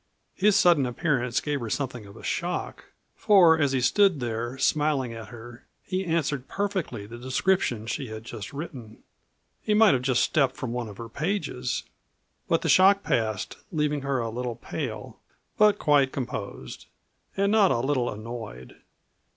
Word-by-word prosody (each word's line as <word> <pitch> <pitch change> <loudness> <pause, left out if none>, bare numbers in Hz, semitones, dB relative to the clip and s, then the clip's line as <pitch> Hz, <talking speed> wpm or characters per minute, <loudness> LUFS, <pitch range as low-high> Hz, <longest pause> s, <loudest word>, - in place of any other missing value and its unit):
His 205 +1 +3
sudden 165 -7 +4
appearance 125 -2 0
gave 145 -1 -2
her 115 -3 -5
something 125 -4 -3
of 100 +3 -13
a - - -13
shock, 175 +1 -3 0.3
for 180 -7 +5
as 145 -3 +2
he 135 - +1
stood 180 +5 +3
there, 120 +1 -3
smiling 140 -3 +1
at 115 -1 -8
her, 120 0 -12 0.2
he 185 0 -2
answered 150 -5 -1
perfectly 190 - -3
the 120 +3 -10
description 130 - 0
she 135 +3 -3
had 110 0 -8
just 110 -3 -8
written. 135 -7 -8 0.6
He 210 - +1
might 215 -2 +6
have 125 - +1
just 125 -1 +2
stepped 135 -4 +1
from 130 -3 -5
one 120 -2 -3
of 100 - -11
her 115 - -7
pages. 180 - -2 0.6
But - - +1
the - - 0
shock 195 +2 +5
passed, 110 -4 -1
leaving 150 -2 0
her 140 -1 -1
a 115 -2 -2
little 120 0 -4
pale, - - -6 0.4
but 210 -1 +5
quite 145 -6 +3
composed 110 - -6 0.5
and 200 +1 +2
not 210 -3 +5
a 130 - +2
little 130 -1 0
annoyed. 110 - -8
130 Hz, 165 wpm, -26 LUFS, 120-165 Hz, 0.6 s, might